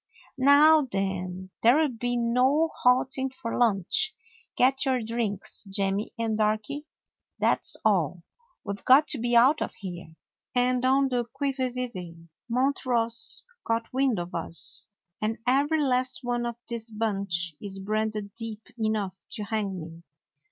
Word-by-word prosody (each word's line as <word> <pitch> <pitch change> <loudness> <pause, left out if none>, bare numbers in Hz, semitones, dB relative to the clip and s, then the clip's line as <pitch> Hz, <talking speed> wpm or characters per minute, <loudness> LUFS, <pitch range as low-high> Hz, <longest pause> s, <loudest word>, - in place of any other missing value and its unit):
"Now 295 +4 +7
then, 185 -1 -3
there 240 +5 +6
'll 315 -1 +3
be 245 +2 -1
no 255 +7 +2
halting 260 +1 +3
for 255 -3 -5
lunch. 240 - +2 0.4
Get 265 +2 +4
your 260 -4 +1
drinks, 220 -3 -3
Jemmy 195 +1 -1
and 225 -1 -1
Darky, 215 +8 -1 0.5
that - - +1
's - - +2
all. 180 -5 +1 0.4
We 200 - -3
've 200 - -10
got 275 +4 +6
to 280 - 0
be 240 +1 0
out 260 +6 +5
of - - -3
here, 175 -4 -8 0.4
and 250 0 +2
on 270 +1 +3
the 245 -2 0
quivy 265 0 -2
vivy. 185 -10 -5 0.3
Montross 245 -2 +2
's 235 - +3 0.2
got 230 +1 -2
wind 260 -4 +2
of 175 0 -5
us, 165 0 -4 0.3
and 220 +1 -1
every 290 +5 +2
last 255 0 0
one 240 -1 -1
of 235 - -4
this 235 -1 -5
bunch 195 -6 -2
is 195 -2 -6
branded 215 0 -2
deep 225 -2 -6 0.2
enough 215 -4 -1 0.2
to 210 - -4
hang 205 -3 -2
me. 165 +1 -10
230 Hz, 150 wpm, -27 LUFS, 200-255 Hz, 0.5 s, Now